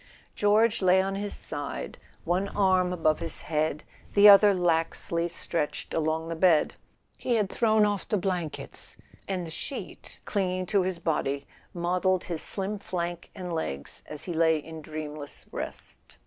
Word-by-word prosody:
George 210 Hz, +2 st, +3 dB
lay 185 Hz, 0 st, +5 dB
on 195 Hz, +1 st, 0 dB
his 200 Hz, +1 st, -3 dB
side, 140 Hz, -, -4 dB, 0.2 s
one 180 Hz, +4 st, 0 dB
arm 185 Hz, -3 st, +2 dB
above 160 Hz, -3 st, +1 dB
his -, -, -3 dB
head, 155 Hz, -1 st, -1 dB, 0.3 s
the 205 Hz, 0 st, +8 dB
other 205 Hz, 0 st, +9 dB
laxly 170 Hz, -1 st, 0 dB
stretched 165 Hz, -2 st, -3 dB
along 160 Hz, 0 st, 0 dB
the 165 Hz, -, -3 dB
bed. 165 Hz, -2 st, +4 dB, 0.5 s
He 245 Hz, -, 0 dB
had 210 Hz, -3 st, +1 dB
thrown 220 Hz, -2 st, +3 dB
off 205 Hz, -2 st, -2 dB
the 210 Hz, -, +2 dB
blankets, 180 Hz, -4 st, -4 dB, 0.3 s
and 185 Hz, -3 st, -2 dB
the 165 Hz, -, -8 dB
sheet, 265 Hz, -, -6 dB
clinging 185 Hz, -2 st, -1 dB
to 200 Hz, +2 st, +2 dB
his 185 Hz, -1 st, -2 dB
body, 140 Hz, -4 st, -1 dB, 0.3 s
modelled 180 Hz, +1 st, 0 dB
his 170 Hz, -3 st, -3 dB
slim 200 Hz, +1 st, +1 dB
flank 175 Hz, -3 st, -4 dB
and 180 Hz, -3 st, -5 dB
legs 70 Hz, -, -4 dB
as 150 Hz, -, -4 dB
he 175 Hz, -, -4 dB
lay 160 Hz, -1 st, +3 dB
in 160 Hz, +1 st, -8 dB
dreamless 150 Hz, -1 st, -6 dB
rest. -, -, -7 dB
175 Hz, 155 wpm, -28 LUFS, 160-195 Hz, 0.5 s, other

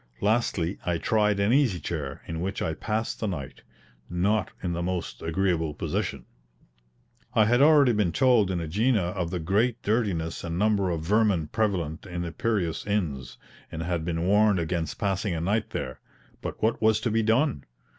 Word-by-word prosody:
Lastly, 100 Hz, -5 st, 0 dB
I 85 Hz, -1 st, 0 dB
tried 105 Hz, +1 st, +1 dB
an 100 Hz, +4 st, +3 dB
easy 130 Hz, -10 st, +3 dB
chair, 75 Hz, -6 st, -5 dB
in 80 Hz, 0 st, -5 dB
which 95 Hz, +2 st, -3 dB
I 80 Hz, -, -1 dB
passed 110 Hz, +6 st, -3 dB
the 110 Hz, -, -1 dB
night, 75 Hz, -9 st, -5 dB, 0.5 s
not 95 Hz, +4 st, +1 dB
in 90 Hz, -2 st, -1 dB
the 85 Hz, -, -2 dB
most 90 Hz, 0 st, -3 dB
agreeable 80 Hz, -2 st, 0 dB
position. 70 Hz, -3 st, -3 dB, 1.1 s
I 110 Hz, -, +5 dB
had 120 Hz, +4 st, +3 dB
already 145 Hz, -3 st, +6 dB
been 105 Hz, -6 st, +1 dB
told 125 Hz, -6 st, +4 dB
in 95 Hz, -, -1 dB
AEgina 95 Hz, +3 st, +1 dB
of 90 Hz, -4 st, -2 dB
the 90 Hz, -, -2 dB
great 110 Hz, +8 st, +1 dB
dirtiness 100 Hz, -7 st, -1 dB
and 85 Hz, 0 st, -3 dB
number 100 Hz, -1 st, +2 dB
of 85 Hz, -2 st, -2 dB
vermin 100 Hz, -3 st, +2 dB
prevalent 95 Hz, -7 st, -1 dB
in 85 Hz, -1 st, -4 dB
the 85 Hz, -, -4 dB
Piraean 100 Hz, -4 st, -1 dB
inns, 80 Hz, -12 st, -2 dB, 0.3 s
and 80 Hz, 0 st, -4 dB
had 85 Hz, -1 st, -2 dB
been 85 Hz, 0 st, -2 dB
warned 105 Hz, +1 st, +4 dB
against 85 Hz, -2 st, -2 dB
passing 100 Hz, -2 st, -1 dB
a -, -, -2 dB
night 105 Hz, +6 st, 0 dB
there; 65 Hz, -, -5 dB, 0.4 s
but -, -, -6 dB
what 110 Hz, +2 st, +1 dB
was 110 Hz, -1 st, +4 dB
to 115 Hz, -, 0 dB
be 115 Hz, +1 st, +2 dB
done? 115 Hz, -, +1 dB
95 Hz, 175 wpm, -26 LUFS, 85-110 Hz, 1.1 s, already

